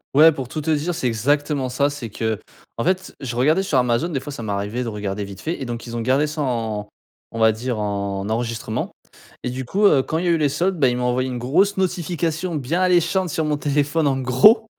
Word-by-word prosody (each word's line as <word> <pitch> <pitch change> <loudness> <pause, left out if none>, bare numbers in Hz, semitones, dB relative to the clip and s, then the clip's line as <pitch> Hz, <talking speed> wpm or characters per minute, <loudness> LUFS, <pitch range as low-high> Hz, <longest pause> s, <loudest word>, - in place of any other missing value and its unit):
Ouais 160 +2 +8
pour 135 -4 -5
tout 155 - -5
te 160 +2 -1
dire, 160 +3 0
c'est 145 - -3
exactement 135 +3 +1
ça. 140 +3 +1
C'est 125 -6 -6
qu'en 110 +1 -5
fait 185 0 -1
je 120 -3 -5
regardais 155 +9 +3
sur 160 -8 0
Amazon, 125 +7 +2
des 140 -5 -1
fois 145 - -8
ça 125 - -7
m'arrivait 105 +3 -2
de - - -5
regarder 105 -1 -3
vite 100 -1 -9
fait 160 -2 -4
et - - -3
donc 120 0 -5
ils 120 0 -7
ont 115 - -2
gardé 130 +5 +2
ça 150 0 -4
en 110 -5 -2 0.4
on 115 - -7
va 110 0 +6
dire 120 +1 -3
en 100 -1 -2
enregistrement. 115 +1 -2 0.5
Et 125 - -2
du 130 0 -4
coup, 205 +10 +1
heu, 145 -8 +6
quand 160 - -2
il 180 - -1
y - - +1
a - - +4
eu 165 - +3
les 145 -2 +3
soldes, 175 +4 0
bah, 135 - +5
ils 125 - -1
m'ont 125 - -2
envoyé 130 +1 0
une 125 - -4
grosse 185 +12 +2
notification 175 -2 -1
bien 150 +6 -1
alléchante 180 0 +2
sur 155 +1 -1
mon 150 -1 +1
téléphone 145 +2 +1
en 135 -1 +1
gros 170 - +5
135 Hz, 245 wpm, -22 LUFS, 115-160 Hz, 0.5 s, Ouais